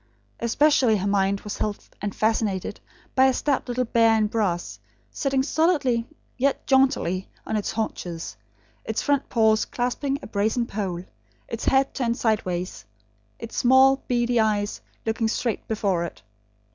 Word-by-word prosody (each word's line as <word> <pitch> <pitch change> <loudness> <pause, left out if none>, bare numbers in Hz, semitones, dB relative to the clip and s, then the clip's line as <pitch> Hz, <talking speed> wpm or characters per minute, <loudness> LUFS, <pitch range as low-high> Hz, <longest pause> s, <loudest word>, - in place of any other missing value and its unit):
Especially 245 -1 +3
her 195 - -3
mind 200 0 +1
was 210 - -6
held 210 -1 -3
and 205 -1 -3
fascinated 215 -3 0 0.3
by 265 0 +5
a 265 - +3
stout 280 -3 0
little 250 +1 -1
bear 225 -1 +4
in 215 - +2
brass, 180 - -1 0.3
sitting 270 -1 0
solidly 280 -7 +1 0.3
yet 275 +2 +1
jauntily 265 -9 +2 0.2
on - - -2
its 210 - -1
haunches, 175 - -4 0.5
its 220 - -2
front 285 -1 +1
paws 220 -2 +3
clasping 265 +3 -2
a - - -6
brazen 220 +4 0
pole; 190 -6 -4 0.4
its 230 - -5
head 270 0 +3
turned 235 -2 -1
sideways; 185 - -1 0.5
its 230 - -8
small, 265 +2 +5
beady, 240 -1 +1
eyes, 210 -1 0 0.2
looking 225 0 0
straight 230 0 -2
before 200 -5 0
it. 170 - -8
225 Hz, 145 wpm, -24 LUFS, 205-255 Hz, 0.5 s, by